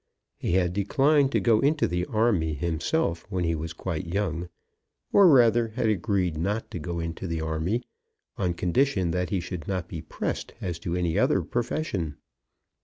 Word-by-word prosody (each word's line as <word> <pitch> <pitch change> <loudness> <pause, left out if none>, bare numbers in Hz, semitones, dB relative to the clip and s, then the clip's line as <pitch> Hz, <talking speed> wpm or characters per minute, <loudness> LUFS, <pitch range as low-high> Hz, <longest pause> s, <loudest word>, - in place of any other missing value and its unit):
He - - -1
had 90 -1 +2
declined 135 +8 +3
to - - +3
go 115 -3 +3
into 145 +4 +2
the 90 +1 -2
army 105 -9 +1
himself 85 - -1
when 90 -1 -1
he 85 -1 +1
was 80 +1 -4
quite 85 +1 -4
young, 85 -2 -2 0.6
or 200 -2 +8
rather 120 -5 +5
had 115 -3 +1
agreed 95 -4 0
not 105 +6 -2
to 90 - -4
go 85 +1 -4
into 85 +2 -4
the 85 -1 -2
army, 80 +9 -1 0.5
on 90 -3 -1
condition 95 0 +1
that 90 +1 -1
he 100 - 0
should 90 -3 -6
not 90 -3 -2
be 80 - -6
pressed 80 - -4
as 85 -2 -4
to 85 +1 -3
any 85 -2 0
other - - +3
profession. 105 - -2
90 Hz, 175 wpm, -26 LUFS, 85-110 Hz, 0.6 s, or